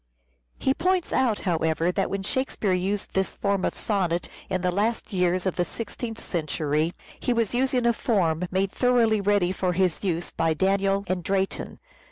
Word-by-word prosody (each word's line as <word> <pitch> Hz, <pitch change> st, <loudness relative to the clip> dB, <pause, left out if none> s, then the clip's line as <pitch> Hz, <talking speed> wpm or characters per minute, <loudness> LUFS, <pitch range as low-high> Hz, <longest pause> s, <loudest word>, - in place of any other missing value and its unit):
He 265 Hz, -, +2 dB
points 365 Hz, +3 st, 0 dB
out, 235 Hz, -5 st, +2 dB
however, 165 Hz, -1 st, +1 dB
that 195 Hz, +1 st, 0 dB
when 195 Hz, 0 st, -3 dB
Shakespeare 225 Hz, -4 st, -1 dB
used 190 Hz, +3 st, -1 dB
this 190 Hz, 0 st, 0 dB
form 200 Hz, -2 st, 0 dB
of -, -, 0 dB
sonnet 180 Hz, -5 st, -1 dB, 0.2 s
in 185 Hz, -, -1 dB
the 180 Hz, 0 st, +1 dB
last 210 Hz, +4 st, -1 dB
years 180 Hz, 0 st, +1 dB
of 190 Hz, -, -1 dB
the 175 Hz, -, +3 dB
sixteenth 230 Hz, +3 st, -5 dB
century, 155 Hz, -1 st, -1 dB, 0.2 s
he 245 Hz, -, +1 dB
was 230 Hz, -2 st, 0 dB
using 255 Hz, 0 st, +1 dB
a 235 Hz, -, +4 dB
form 180 Hz, -8 st, +1 dB
" -, -, -30 dB
made 190 Hz, +1 st, +1 dB
thoroughly 235 Hz, -4 st, +3 dB
ready 200 Hz, -3 st, +2 dB
for 185 Hz, -1 st, 0 dB
his 180 Hz, 0 st, +1 dB
use 175 Hz, -3 st, -1 dB
by 165 Hz, -1 st, +1 dB
Daniel 195 Hz, +2 st, +2 dB
and 185 Hz, -1 st, -2 dB
Drayton." 195 Hz, +2 st, -1 dB
190 Hz, 180 wpm, -26 LUFS, 180-220 Hz, 0.2 s, a